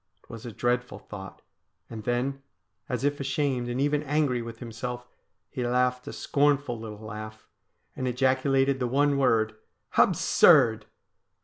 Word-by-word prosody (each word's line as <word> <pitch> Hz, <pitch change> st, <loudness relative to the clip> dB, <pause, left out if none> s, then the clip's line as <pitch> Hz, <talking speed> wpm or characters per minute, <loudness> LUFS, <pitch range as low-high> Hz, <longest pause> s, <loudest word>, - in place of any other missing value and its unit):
It -, -, -16 dB
was 115 Hz, +1 st, -8 dB
a -, -, -6 dB
dreadful 125 Hz, +3 st, -1 dB
thought; 95 Hz, -2 st, -10 dB, 0.4 s
and 110 Hz, -1 st, -8 dB
then, 130 Hz, +3 st, -1 dB, 0.5 s
as 125 Hz, 0 st, -2 dB
if 145 Hz, 0 st, 0 dB
ashamed 135 Hz, -3 st, -1 dB
and 120 Hz, +1 st, -2 dB
even 145 Hz, +1 st, +1 dB
angry 145 Hz, -4 st, 0 dB
with 115 Hz, -1 st, -7 dB
himself, 120 Hz, +1 st, -6 dB, 0.4 s
he 125 Hz, -, -3 dB
laughed 125 Hz, +1 st, 0 dB
a -, -, -4 dB
scornful 140 Hz, -4 st, +1 dB
little 110 Hz, -1 st, -8 dB
laugh, 110 Hz, 0 st, -8 dB, 0.5 s
and 130 Hz, -, -3 dB
ejaculated 135 Hz, +1 st, +2 dB
the 125 Hz, -, 0 dB
one 140 Hz, +2 st, +2 dB
word: 110 Hz, -4 st, +2 dB, 0.2 s
' -, -, -15 dB
Absurd 110 Hz, -1 st, +5 dB
125 Hz, 145 wpm, -27 LUFS, 115-135 Hz, 0.5 s, Absurd